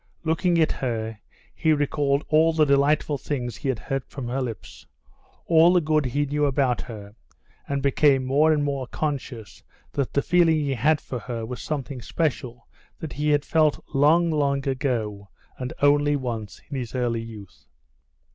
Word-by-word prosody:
Looking 170 Hz, +2 st, +1 dB
at 160 Hz, -, +3 dB
her, 115 Hz, -4 st, -3 dB, 0.3 s
he 160 Hz, -1 st, +2 dB
recalled 145 Hz, -1 st, 0 dB
all 160 Hz, +1 st, +4 dB
the 155 Hz, -1 st, +4 dB
delightful 145 Hz, +1 st, +2 dB
things 125 Hz, -5 st, -3 dB
he 135 Hz, -, -3 dB
had 130 Hz, -, 0 dB
heard 135 Hz, +3 st, -3 dB
from 130 Hz, -2 st, -7 dB
her 135 Hz, +2 st, -1 dB
lips, 115 Hz, -6 st, -7 dB, 0.6 s
all 165 Hz, +1 st, +5 dB
the 180 Hz, -, +5 dB
good 155 Hz, -3 st, +1 dB
he 145 Hz, +4 st, 0 dB
knew 145 Hz, +1 st, 0 dB
about 135 Hz, -3 st, +1 dB
her, 105 Hz, -4 st, -9 dB, 0.5 s
and 140 Hz, -1 st, -2 dB
became 140 Hz, -1 st, +3 dB
more 145 Hz, +5 st, +3 dB
and 150 Hz, -2 st, +2 dB
more 140 Hz, -3 st, -2 dB
conscious 130 Hz, -8 st, -5 dB, 0.3 s
that 140 Hz, -3 st, -2 dB
the 140 Hz, -, +1 dB
feeling 175 Hz, -2 st, +4 dB
he 145 Hz, -3 st, 0 dB
had 145 Hz, +5 st, +2 dB
for 125 Hz, -, -6 dB
her 115 Hz, 0 st, -5 dB
was 125 Hz, +2 st, -6 dB
something 140 Hz, -3 st, -4 dB
special 125 Hz, -5 st, -3 dB, 0.3 s
that 160 Hz, -, -7 dB
he 150 Hz, +1 st, -1 dB
had 145 Hz, -1 st, +2 dB
felt 155 Hz, -2 st, +2 dB
long, 160 Hz, +5 st, +4 dB
long 140 Hz, -2 st, 0 dB
ago, 115 Hz, -7 st, -2 dB, 0.3 s
and 125 Hz, -1 st, -4 dB
only 145 Hz, 0 st, +4 dB
once, 115 Hz, -6 st, -5 dB
in 140 Hz, -, -5 dB
his 120 Hz, 0 st, -6 dB
early 120 Hz, -2 st, 0 dB
youth. 100 Hz, -, -11 dB
140 Hz, 170 wpm, -24 LUFS, 125-150 Hz, 0.6 s, all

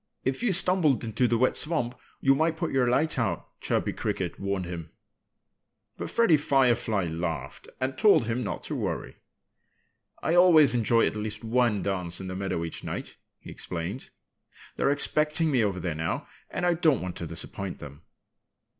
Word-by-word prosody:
"If 130 Hz, 0 st, -1 dB
you 240 Hz, -4 st, +2 dB
stumbled 175 Hz, -7 st, +3 dB
into 115 Hz, +2 st, +1 dB
the 115 Hz, -, +2 dB
wet 130 Hz, +2 st, +2 dB
swamp 150 Hz, -7 st, 0 dB, 0.3 s
you 135 Hz, -, +5 dB
might 160 Hz, +3 st, +1 dB
put 170 Hz, -1 st, -2 dB
your 130 Hz, -2 st, +2 dB
light 140 Hz, +3 st, +1 dB
out," 100 Hz, -8 st, -1 dB
Chirpy -, -, 0 dB
Cricket -, -, -3 dB
warned 100 Hz, -1 st, -2 dB
him. 85 Hz, -2 st, -6 dB, 1.1 s
But -, -, -5 dB
Freddie 230 Hz, -10 st, +4 dB
Firefly 125 Hz, -8 st, +2 dB
laughed 80 Hz, -5 st, -4 dB
and 130 Hz, 0 st, -2 dB
told 200 Hz, -, +5 dB
him 115 Hz, +2 st, -1 dB
not 105 Hz, -, -4 dB
to -, -, -4 dB
worry. -, -, -4 dB, 1.1 s
"I 160 Hz, -, +1 dB
always 165 Hz, -7 st, +7 dB
enjoy 115 Hz, -1 st, +3 dB
at -, -, -1 dB
least 105 Hz, +1 st, -5 dB
one 115 Hz, -2 st, +1 dB
dance 90 Hz, -3 st, -2 dB
in 95 Hz, -, -6 dB
the 95 Hz, -, -5 dB
meadow 95 Hz, -3 st, -2 dB
each 80 Hz, -, -7 dB
night," -, -, -5 dB, 0.2 s
he -, -, -11 dB
explained. 90 Hz, +9 st, -5 dB, 0.7 s
"They're -, -, +1 dB
expecting 150 Hz, +2 st, +1 dB
me 125 Hz, -5 st, +3 dB
over 100 Hz, -3 st, -1 dB
there 85 Hz, -2 st, -2 dB
now. 80 Hz, +1 st, -3 dB, 0.2 s
And 180 Hz, -, -2 dB
I 175 Hz, -, +4 dB
don't 160 Hz, -6 st, +2 dB
want 90 Hz, -1 st, -5 dB
to -, -, -5 dB
disappoint 100 Hz, -2 st, -5 dB
them." 70 Hz, +1 st, -11 dB
120 Hz, 170 wpm, -27 LUFS, 95-150 Hz, 1.1 s, always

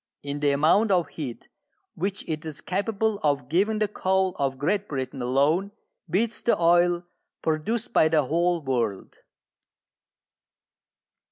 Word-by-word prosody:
In 145 Hz, 0 st, -4 dB
the 145 Hz, 0 st, +2 dB
amount 160 Hz, +10 st, +3 dB
of 175 Hz, -6 st, +2 dB
heat 140 Hz, -6 st, -7 dB, 0.5 s
which 195 Hz, +3 st, -3 dB
it 155 Hz, -1 st, -3 dB
is 155 Hz, -2 st, -6 dB
capable 205 Hz, +2 st, -1 dB
of 140 Hz, -4 st, 0 dB
giving 200 Hz, +7 st, +2 dB
the 210 Hz, 0 st, +1 dB
coal 190 Hz, -2 st, 0 dB
of 135 Hz, -1 st, 0 dB
Great 195 Hz, +9 st, 0 dB
Britain 130 Hz, -1 st, -4 dB
alone 145 Hz, +11 st, +1 dB, 0.4 s
beats 220 Hz, +7 st, 0 dB
the 235 Hz, -, +2 dB
oil 175 Hz, +1 st, +3 dB, 0.4 s
produced 210 Hz, +10 st, -1 dB
by 155 Hz, -, +5 dB
the 155 Hz, -2 st, +3 dB
whole 170 Hz, +3 st, +1 dB
world. 120 Hz, -7 st, -2 dB
165 Hz, 135 wpm, -25 LUFS, 145-195 Hz, 0.5 s, by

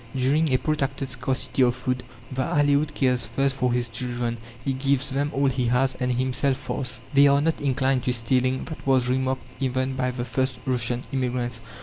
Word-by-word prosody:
During 140 Hz, +4 st, +2 dB
a 130 Hz, -, +4 dB
protracted 135 Hz, -1 st, -2 dB
scarcity 130 Hz, +1 st, -1 dB
of 120 Hz, -1 st, +4 dB
food, 125 Hz, 0 st, -2 dB, 0.3 s
the 130 Hz, 0 st, -2 dB
Aleoute 145 Hz, +2 st, +2 dB
cares 125 Hz, -5 st, +1 dB
first 135 Hz, +4 st, +1 dB
for 125 Hz, -2 st, 0 dB
his 120 Hz, 0 st, 0 dB
children; 120 Hz, 0 st, -3 dB, 0.3 s
he 135 Hz, -, +1 dB
gives 135 Hz, 0 st, +2 dB
them 140 Hz, +2 st, 0 dB
all 140 Hz, +1 st, 0 dB
he 130 Hz, -2 st, +1 dB
has, 125 Hz, +2 st, +2 dB
and 125 Hz, -1 st, -2 dB
himself 130 Hz, +2 st, 0 dB
fasts. 125 Hz, -3 st, -3 dB
They 140 Hz, +1 st, +7 dB
are 140 Hz, 0 st, +4 dB
not 160 Hz, +2 st, 0 dB
inclined 135 Hz, -1 st, +1 dB
to 125 Hz, -, +2 dB
stealing; 130 Hz, +2 st, +1 dB
that 160 Hz, -4 st, -9 dB
was 130 Hz, -2 st, +4 dB
remarked 130 Hz, 0 st, 0 dB, 0.2 s
even 130 Hz, 0 st, -1 dB
by 130 Hz, -1 st, 0 dB
the 125 Hz, -1 st, -4 dB
first 130 Hz, +1 st, -1 dB
Russian 125 Hz, -1 st, 0 dB
immigrants. 125 Hz, -3 st, -2 dB
130 Hz, 190 wpm, -25 LUFS, 125-135 Hz, 0.3 s, They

